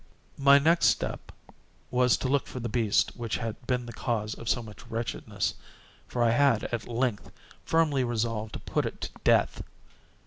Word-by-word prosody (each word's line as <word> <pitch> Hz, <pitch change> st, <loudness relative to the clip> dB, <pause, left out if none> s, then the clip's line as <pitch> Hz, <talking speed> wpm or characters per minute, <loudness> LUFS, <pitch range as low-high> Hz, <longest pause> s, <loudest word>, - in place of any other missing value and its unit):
My 140 Hz, 0 st, +7 dB
next 165 Hz, +4 st, +4 dB
step -, -, -1 dB, 0.6 s
was 125 Hz, -1 st, +3 dB
to -, -, -2 dB
look 135 Hz, 0 st, +1 dB
for 130 Hz, -, -6 dB
the 120 Hz, -, -3 dB
beast 110 Hz, -2 st, +1 dB
which 115 Hz, -3 st, -3 dB
had 115 Hz, +1 st, -6 dB
been 125 Hz, -1 st, 0 dB
the 120 Hz, -, -8 dB
cause 110 Hz, -4 st, -2 dB
of 115 Hz, -, -6 dB
so 120 Hz, -, +1 dB
much 110 Hz, +2 st, -12 dB
wretchedness; 115 Hz, 0 st, -2 dB, 0.5 s
for 120 Hz, -, 0 dB
I 115 Hz, -, +4 dB
had, 120 Hz, -2 st, +3 dB
at 115 Hz, -3 st, -4 dB
length, 120 Hz, -2 st, -1 dB, 0.4 s
firmly 155 Hz, -5 st, +2 dB
resolved 115 Hz, -2 st, -2 dB
to -, -, -5 dB
put -, -, -1 dB
it -, -, -7 dB
to -, -, -3 dB
death. -, -, +3 dB
120 Hz, 175 wpm, -28 LUFS, 115-130 Hz, 0.6 s, My